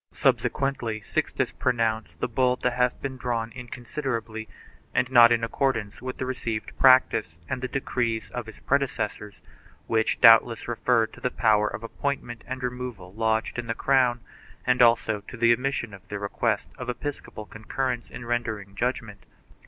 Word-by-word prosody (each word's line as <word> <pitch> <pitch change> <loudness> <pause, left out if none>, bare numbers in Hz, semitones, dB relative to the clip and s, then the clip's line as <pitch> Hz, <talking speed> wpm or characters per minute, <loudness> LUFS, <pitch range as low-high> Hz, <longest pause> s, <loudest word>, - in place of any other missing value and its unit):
1 - - -24
Subsequently 120 -5 0
Sixtus 95 - -1
pronounced 115 -3 -1
the - - +1
bull 125 +1 +2
to 125 - 0
have 125 0 +1
been 135 -1 -4
drawn 115 -2 -2
inconsiderately 120 -2 -5 0.5
and 125 +1 +1
not 120 -2 +8
in 115 -1 +2
accordance 115 -3 -1
with 130 0 -6
received 120 -4 -4
practice 130 -10 +5
and 130 -1 -3
the 130 - -2
decrees 120 -4 -2
of 120 -2 -5
his 110 - -10
predecessors, 115 -6 -1 0.5
which 110 -1 +1
doubtless 115 0 +6
referred 120 -1 +1
to - - -13
the 125 - +1
power 105 -3 +3
of 110 - -5
appointment 120 -2 -4
and 130 0 -5
removal 125 -7 -5
lodged 110 +2 0
in 120 - -5
the 115 - -2
crown 125 -3 +2 0.4
and 125 0 +3
also 115 -3 +4
to - - -8
the 115 0 +5
omission 125 -3 -2
of 95 -2 -13
the 105 - -4
requirement 100 0 -1
of - - -5
epis 140 +4 -4
^ - - -27
copal 110 - -9
concurrence 120 +3 -3
in 120 - -8
rendering 110 -4 -3
judgment. 115 -3 -3
120 Hz, 165 wpm, -26 LUFS, 110-125 Hz, 0.5 s, not